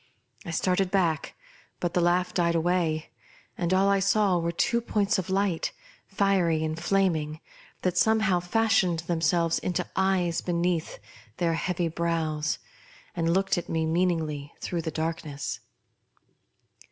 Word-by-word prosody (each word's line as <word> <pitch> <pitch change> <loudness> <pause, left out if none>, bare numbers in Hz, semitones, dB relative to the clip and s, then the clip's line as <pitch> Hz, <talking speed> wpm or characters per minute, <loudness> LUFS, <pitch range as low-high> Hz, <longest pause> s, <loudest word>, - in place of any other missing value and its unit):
I - - -4
started. 180 +3 +1
back, 175 -5 0 0.4
but 175 0 -2
the 180 - +2
laugh 180 +1 +2
died 170 -2 +2
away, 165 -2 0 0.4
and 175 0 -1
all 190 +1 +4
I 200 0 +3
saw 200 -1 +3
were 170 0 -1
two 235 +7 +1
points 210 -2 +1
of 190 - -4
light, 190 -3 0 0.3
fiery 190 -5 +2
and 160 +1 -3
flaming, 165 -5 +1 0.4
that 180 -1 +1
somehow 215 -5 +3
fashioned 185 -3 +2
themselves 165 0 +1
into 180 0 -2
eyes 190 -3 +1
beneath 175 -1 -1 0.4
their 170 -1 +1
heavy 175 +1 -1
brows, 160 -2 -1 0.6
and 165 -1 +1
looked 195 0 +2
at - - -9
me 160 -1 0
meaningly 160 -4 0
through 170 -2 -3
the 160 - -3
darkness. 160 -2 -4
175 Hz, 135 wpm, -27 LUFS, 165-190 Hz, 0.6 s, all